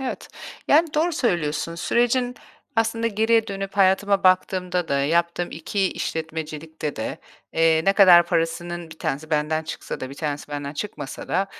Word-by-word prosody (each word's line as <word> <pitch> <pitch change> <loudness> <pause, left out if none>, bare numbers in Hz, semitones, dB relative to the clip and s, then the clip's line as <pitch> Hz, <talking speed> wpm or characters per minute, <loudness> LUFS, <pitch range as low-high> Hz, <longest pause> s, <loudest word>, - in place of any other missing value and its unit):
Evet, 265 - -5 0.4
yani, 315 +1 +4
doğru 330 +3 +2
söylüyorsun. 165 - -1
Sürecin, 245 +6 +1 0.4
aslında 225 +1 +1
geriye 225 +1 +2
dönüp 195 -1 -5
hayatıma 195 0 +3
baktığımda 185 -1 +2
da, 140 0 +1
yaptığım 170 +4 0
2 190 +4 -1
işletmecilikte 160 -1 -5
de, 110 - -4 0.3
eee, 160 -1 +3
ne 195 - +4
kadar 180 -4 +7
parasının 170 0 -2
1 160 - -12
tanesi 155 +4 -3
benden 155 +1 0
çıksa 160 - -6
da 130 0 -5
1 - - -8
tanesi 145 -1 -4
benden 145 -1 -5
çıkmasa 145 -4 -6
da, 190 +3 +1
175 Hz, 150 wpm, -23 LUFS, 155-200 Hz, 0.4 s, kadar